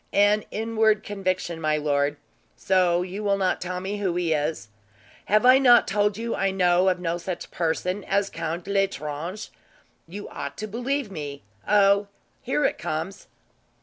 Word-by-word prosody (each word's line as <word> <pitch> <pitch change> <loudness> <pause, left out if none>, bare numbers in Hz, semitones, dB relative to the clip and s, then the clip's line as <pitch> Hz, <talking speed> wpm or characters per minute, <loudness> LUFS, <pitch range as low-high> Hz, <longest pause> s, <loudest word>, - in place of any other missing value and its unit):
"An 205 +1 +3
inward 220 -1 +1
conviction, 185 -4 -3
my 155 -1 +1
lord. 145 -1 0 0.4
So 180 -2 +2
you 190 +3 -6
will 200 -1 +2
not 190 -2 0
tell 180 0 -3
me 195 +3 -4
who 190 -4 -1
he 175 -2 +1
is?" 150 -6 -2 0.6
"Have 215 +3 +3
I 255 +1 +8
not 245 -3 +6
told 205 0 +1
you 230 +1 -3
I 195 - +1
know 180 -1 +3
of 180 -1 0
no 170 -1 -2
such 175 +1 -6
person 180 +4 -1
as 200 0 0
Count 165 +2 -4
L'Estrange? 190 -2 -2 0.6
You 200 +5 -8
ought - - -6
to 215 - -4
believe 245 +2 -2
me. 145 - -6 0.2
Oh, 200 0 +4 0.3
here 270 +3 0
it - - 0
comes." 165 +3 -4
190 Hz, 160 wpm, -25 LUFS, 170-205 Hz, 0.6 s, I